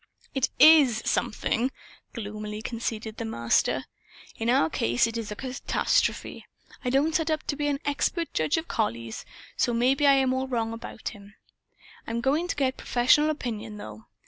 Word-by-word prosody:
"It 270 -2 +1
IS 285 -8 +7
'something,'" 230 +3 0 0.4
gloomily 210 -1 -6
conceded 225 -1 -4
the - - -4
Master. 115 - +1 0.5
"In 225 +1 -2
our 240 -10 +4
case 120 - +1
it 230 0 -4
is 225 -2 -4
a - - -4
catastrophe. 260 +3 -1 0.4
I 250 - 0
don't 280 +5 +2
set 320 0 +1
up 310 -1 0
to 285 - -2
be 295 0 -1
an 285 -1 0
expert 320 +4 -1
judge 155 - +1
of 325 +1 -3
collies, 115 - -3 0.3
so 240 - +1
maybe 265 +5 +3
I 280 - +7
am 265 -1 +3
all 260 0 -1
wrong 230 -3 -1
about 225 -1 -6
him. 205 -2 -14 0.7
I'm 230 +1 -2
going 285 +8 +1
to - - -2
get 265 -2 0
professional 255 +5 +3
opinion, 225 -7 -4
though. 110 - -10
240 Hz, 170 wpm, -27 LUFS, 215-275 Hz, 0.7 s, IS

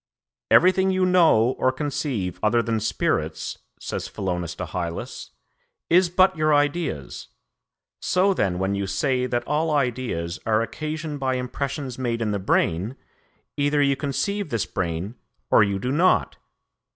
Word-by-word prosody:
"'Everything 190 +1 +5
you 185 -1 +2
know 165 -11 +5
or 130 - +3
conceive 130 - -3
other 115 +2 +2
than 115 -1 -1
spirits,' 110 - -1 0.2
says - - -4
Philonous 90 -3 -3
to - - -4
Hylas, 85 -4 -5 0.6
'is 180 +1 +5
but 185 +2 +4
your 155 -1 +3
ideas; 145 - -1 0.7
so 190 +2 +2
then 95 - 0
when 95 +2 0
you 100 0 -2
say 125 +6 0
that 120 -1 -1
all 155 +2 0
ideas 125 - -1
are 110 0 +2
occasioned 155 +5 -5
by 130 -1 0
impressions 130 +1 -4
made 120 -2 -1
in 110 -2 -1
the 100 - -1
brain, 95 +4 0 0.6
either 145 +1 +1
you 140 -1 +3
conceive 165 +8 -2
this 115 -6 -1
brain 90 +3 -3 0.4
or - - +7
you 100 -2 +2
do 125 +6 -2
not. 175 +6 +2
130 Hz, 145 wpm, -24 LUFS, 100-155 Hz, 0.7 s, or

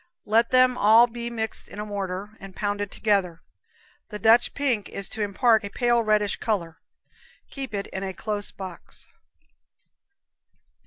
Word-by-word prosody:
Let 230 +2 +3
them 255 -1 +4
all 220 +3 +7
be 235 0 -6
mixed 225 -2 -2
in - - -12
a 210 - -3
mortar, 200 -1 -4
and 195 -1 -11
pounded 205 -1 -2
together. 195 -7 0 0.7
The 210 - -6
Dutch 225 +3 +4
pink 255 -8 -1
is 200 -2 -2
to 220 - -5
impart 220 +2 +3
a 200 - -5
pale 240 +2 +2
reddish 215 -2 +1
color. 170 -7 -3 0.7
Keep 270 -6 -6
it 200 - -3
in 190 - -6
a 195 -1 -3
close 205 +1 -4
box. 185 -3 -7
210 Hz, 150 wpm, -25 LUFS, 200-235 Hz, 0.7 s, all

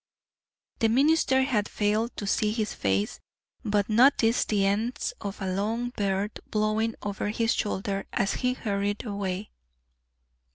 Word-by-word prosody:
The 225 - +3
minister 265 +1 +4
had 220 -7 0
failed 215 +3 0
to 205 - -4
see 210 +2 +1
his 215 -1 -2
face, 100 +1 -1 0.4
but 205 -1 +1
noticed 230 0 +4
the 200 -2 +2
ends 215 +5 -1
of 200 -1 -5
a 190 -2 -2
long 225 +5 -1
beard 200 -1 -2
blowing 215 +1 0
over 205 0 -2
his 225 +1 +1
shoulder 195 -1 -2
as 195 - 0
he 250 -1 +2
hurried 205 -2 -2
away. 200 -1 -3
210 Hz, 135 wpm, -27 LUFS, 200-230 Hz, 0.4 s, minister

